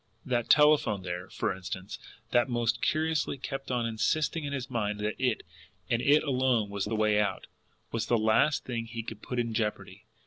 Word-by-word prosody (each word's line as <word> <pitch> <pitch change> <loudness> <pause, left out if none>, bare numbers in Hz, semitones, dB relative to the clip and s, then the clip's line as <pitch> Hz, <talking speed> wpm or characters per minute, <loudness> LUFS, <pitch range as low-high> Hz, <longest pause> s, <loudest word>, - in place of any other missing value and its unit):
That 120 -2 -1
telephone 150 -10 +5
there, 90 0 -5
for - - -2
instance, 95 +1 -6 0.3
that 120 +1 +3
most 120 -1 0
curiously 155 -2 0
kept 135 +1 -5
on 120 -2 0
insisting 145 +7 0
in 140 - -3
his 135 -3 -3
mind 105 -5 -2
that 105 +1 0
it, 125 -3 +1 0.5
and 115 0 +2
it 145 +3 +4
alone 125 -6 +1
was 100 -1 -2
the 105 +2 -2
way 105 -1 +3
out, 105 -1 -1 0.5
was 115 0 -2
the 120 - +3
last 110 +7 +2
thing 115 -2 -3
he 115 0 -5
could 110 -1 -8
place 125 - -3
in 115 -1 -3
jeopardy. 110 -1 -3
115 Hz, 185 wpm, -29 LUFS, 105-130 Hz, 0.5 s, telephone